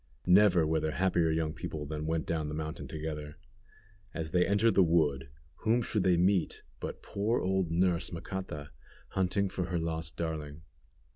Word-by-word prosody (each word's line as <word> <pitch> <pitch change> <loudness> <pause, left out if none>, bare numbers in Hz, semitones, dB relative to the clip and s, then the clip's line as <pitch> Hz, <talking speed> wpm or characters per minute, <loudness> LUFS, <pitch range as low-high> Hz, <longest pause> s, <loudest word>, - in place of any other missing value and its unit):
Never 90 -2 +6
were 80 +1 +1
there 80 0 -1
happier 90 -2 +2
young 80 -1 0
people 75 0 -5
than 75 +1 -4
went 80 -1 0
down 80 -2 -1
the 75 - -4
mountain 80 +1 -5
together. 75 0 -5 0.8
As 80 -2 -4
they 90 +1 +3
entered 105 +3 +3
the - - +5
wood, 75 -6 +2 0.3
whom 115 +2 +2
should 105 -2 0
they 90 -2 +3
meet 90 0 +2 0.2
but - - -6
poor 105 +4 0
old 95 -2 0
nurse, 85 0 +1
Macata, 85 -4 -6 0.4
hunting 95 +1 +1
for 90 -1 -3
her 85 0 -2
lost 80 0 -3
darling. 80 -2 -4
85 Hz, 165 wpm, -31 LUFS, 80-95 Hz, 0.8 s, Never